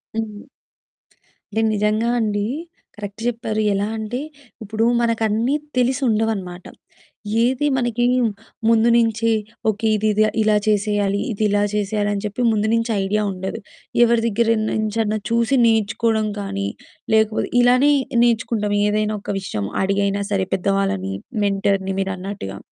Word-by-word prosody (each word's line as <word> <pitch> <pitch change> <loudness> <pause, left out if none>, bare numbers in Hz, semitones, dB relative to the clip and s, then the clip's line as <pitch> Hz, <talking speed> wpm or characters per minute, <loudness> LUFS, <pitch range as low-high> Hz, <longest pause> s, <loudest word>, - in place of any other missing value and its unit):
హ్మ్. 215 -2 -5 1.1
అంటే 220 - 0
నిజంగా 215 +3 +1
అండి 205 -2 0 0.5
కరెక్ట్ 205 +1 -8
చెప్పారు. 220 -2 -2
ఎలా 200 +1 0
అంటే 220 +3 -4 0.4
ఇప్పుడు 220 +2 -2 0.2
మనకన్నీ 230 +3 +1 0.2
తెలిసుండవనమాట. 220 -8 0 0.8
ఏది 260 +4 +1
మనకి 240 -1 0 0.7
ముందు 230 0 +4
నుంచి 230 -1 +2 0.4
ఓకే 220 +1 -1
ఇది 215 +1 0
ఇది 215 +1 +3 0.2
ఇలా 215 -1 +3
చేసేయాలి, 205 -1 +1
ఇది 215 +1 -2
ఇలా 205 0 +2
చేసేయాలి 205 0 0
అని 200 +1 -3
చెప్పి 210 +4 -3
ముందు 215 0 +1
నుంచి 230 0 +1
ఐడియా 210 +2 0
ఉండదు. 190 +4 -5 0.4
ఎవరి 235 -1 +3
దగ్గర 225 +1 +1 0.2
నుంచన్నా 215 0 -1
చూసి 235 +3 +2
నేర్చుకోవడం 220 0 +1
కానీ, 100 - -3 0.5
లేకపోతే 220 0 +2
ఇలానే 250 +4 +5 0.3
నేర్చుకుంటాం, 225 -3 +1
ఏదైనా 215 +1 0
ఒక - - -10
విషయం 105 - -4 0.2
అడిగైనా 200 +1 0
సరే 190 -2 +1
పెద్దవాళ్ళని, 185 - 0 0.3
మెంటర్‌ని, 195 -1 0
మీరన్నట్టుగా. 190 - -4
215 Hz, 120 wpm, -21 LUFS, 200-225 Hz, 1.1 s, ఇలానే